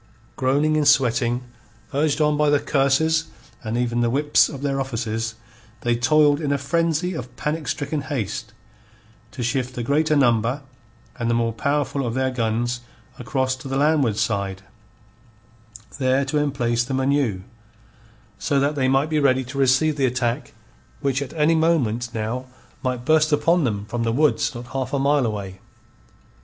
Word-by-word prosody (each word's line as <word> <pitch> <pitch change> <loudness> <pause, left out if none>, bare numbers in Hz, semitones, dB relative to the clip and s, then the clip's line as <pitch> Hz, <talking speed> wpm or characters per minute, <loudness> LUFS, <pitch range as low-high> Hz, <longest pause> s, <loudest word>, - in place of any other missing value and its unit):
Groaning 145 +4 +1
and 150 -2 +2
sweating, 125 -3 +3 0.5
urged 145 +2 +1
on 150 0 +3
by 150 0 +2
the 145 0 +4
curses 160 +4 +2 0.4
and 110 +1 -2
even 120 -1 0
the 120 - +2
whips 145 +4 +3
of 140 -2 -8
their 135 -1 0
officers, 115 -3 -3 0.5
they 120 0 +1
toiled 145 +4 +3
in 145 -2 -1
a 140 - +2
frenzy 165 +5 0
of 125 -5 -7
panic 150 +1 -3
stricken 145 +2 -2
haste 130 -7 -4 0.8
to 125 - -6
shift 130 +1 -1
the 120 - -3
greater 150 +4 +2
number 125 0 +2 0.6
and 115 -1 -1
the 120 - +2
more 115 -1 0
powerful 140 +2 -1
of 120 -1 -3
their 130 0 0
guns 120 0 -1 0.4
across 130 -3 -1
to 130 - -9
the 135 0 -2
landward 140 -7 +2
side, 100 -3 -1 1.4
there 130 +1 +2
to 150 +3 -1
emplace 120 -5 0
them 130 +1 -2
anew, 130 -8 0 1.0
so 140 - +1
that 140 +2 +1
they 135 -3 0
might 135 +4 +2
be 155 - +2
ready 130 -2 +3
to 130 +2 -6
receive 140 +3 +3
the 135 -2 +2
attack 125 +1 -2 0.5
which 140 -1 0
at 140 - -5
any 160 0 +3
moment 135 -8 +1
now 115 +3 -3 0.3
might 125 -2 -3
burst 155 +1 +3
upon 165 +2 +3
them 105 -4 -2
from 120 +2 -4
the 115 0 0
woods 145 +1 +1
not 120 +1 -7
half 130 0 -3
a - - +2
mile 140 -1 +2
away. 100 -3 -5
135 Hz, 165 wpm, -22 LUFS, 120-145 Hz, 1.4 s, the